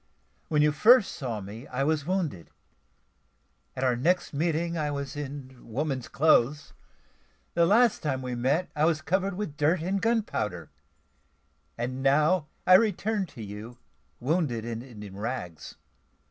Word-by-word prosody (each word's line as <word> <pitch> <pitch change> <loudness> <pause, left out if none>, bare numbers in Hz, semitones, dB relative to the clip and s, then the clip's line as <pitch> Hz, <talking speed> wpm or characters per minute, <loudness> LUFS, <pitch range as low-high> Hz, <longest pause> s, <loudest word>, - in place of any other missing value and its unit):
When 150 -1 +2
you 150 - +4
first 220 - +5
saw 120 -8 -4
me, 105 +7 -9
I 125 +2 -2
was 155 0 0
wounded; 170 - -2 1.3
at 130 - -3
our 125 -2 +3
next 170 +10 +1
meeting 165 +3 0
I 150 -2 -1
was 140 -1 -4
in 140 -2 -7
woman's 130 +1 -3
clothes; 145 -1 +2 0.8
the 170 0 +3
last 230 +3 +4
time 135 -4 -2
we 125 -1 -3
met 135 +8 0
I 150 +1 +3
was 160 -2 +2
covered 190 +3 0
with 180 -7 -5
dirt 155 +4 +2
and 190 +2 -1
gunpowder; 215 - -1 1.1
and 125 +2 -3
now 150 +4 +3 0.2
I 185 - +6
return 210 0 +3
to 125 -7 -10
you, 105 +4 -8 0.4
wounded 130 -5 0
and 115 -1 -4 0.2
in 100 -2 -9
rags. 100 - -5
145 Hz, 145 wpm, -27 LUFS, 125-175 Hz, 1.3 s, I